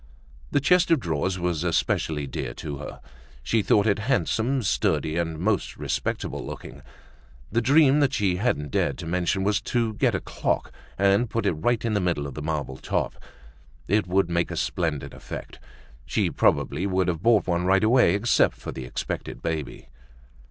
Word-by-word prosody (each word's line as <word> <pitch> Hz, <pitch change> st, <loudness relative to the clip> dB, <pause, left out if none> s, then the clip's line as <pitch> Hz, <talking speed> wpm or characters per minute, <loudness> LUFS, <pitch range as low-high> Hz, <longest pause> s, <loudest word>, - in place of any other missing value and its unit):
The -, -, +2 dB
chest 180 Hz, +5 st, +3 dB
of 165 Hz, -3 st, +4 dB
drawers 90 Hz, -, -1 dB
was 90 Hz, -2 st, -1 dB
especially 80 Hz, -3 st, 0 dB
dear 65 Hz, -2 st, -5 dB
to 75 Hz, -2 st, -6 dB
her. 75 Hz, -, -8 dB, 0.4 s
She 115 Hz, -, +1 dB
thought 100 Hz, 0 st, +3 dB
it 105 Hz, -1 st, +2 dB
handsome, 125 Hz, +1 st, 0 dB
sturdy 80 Hz, -4 st, 0 dB
and 85 Hz, -2 st, -1 dB
most 100 Hz, +4 st, -1 dB
respectable -, -, -3 dB
looking. -, -, -8 dB, 0.7 s
The 115 Hz, +3 st, +2 dB
dream 140 Hz, +3 st, +5 dB
that 145 Hz, -2 st, +3 dB
she 95 Hz, -3 st, +1 dB
hadn't 80 Hz, -, -1 dB
dared -, -, 0 dB
to -, -, -7 dB
mention 90 Hz, +3 st, 0 dB
was 100 Hz, 0 st, +1 dB
to 115 Hz, -3 st, -1 dB
get -, -, +1 dB
a -, -, 0 dB
clock -, -, -2 dB, 0.3 s
and 100 Hz, +4 st, +3 dB
put 115 Hz, -, -2 dB
it -, -, +3 dB
right 115 Hz, +10 st, 0 dB
in 115 Hz, -, 0 dB
the 100 Hz, -, +1 dB
middle 85 Hz, -5 st, 0 dB
of 70 Hz, -, -6 dB
the 75 Hz, -, -6 dB
marble 75 Hz, -4 st, -3 dB
top. -, -, -2 dB, 0.7 s
It 105 Hz, 0 st, +2 dB
would 95 Hz, 0 st, +2 dB
make 85 Hz, 0 st, 0 dB
a -, -, -5 dB
splendid 80 Hz, -5 st, -2 dB
effect. -, -, -8 dB, 0.5 s
She -, -, 0 dB
probably 95 Hz, -, +1 dB
would 95 Hz, -1 st, +1 dB
have 85 Hz, -3 st, -1 dB
bought 115 Hz, -1 st, +4 dB
one 90 Hz, -1 st, 0 dB
right 95 Hz, +2 st, +3 dB
away 120 Hz, 0 st, +5 dB
except 110 Hz, +2 st, +3 dB
for -, -, -7 dB
the 65 Hz, -, -7 dB
expected -, -, -5 dB
baby. 75 Hz, -7 st, -4 dB
95 Hz, 180 wpm, -25 LUFS, 80-110 Hz, 0.7 s, dream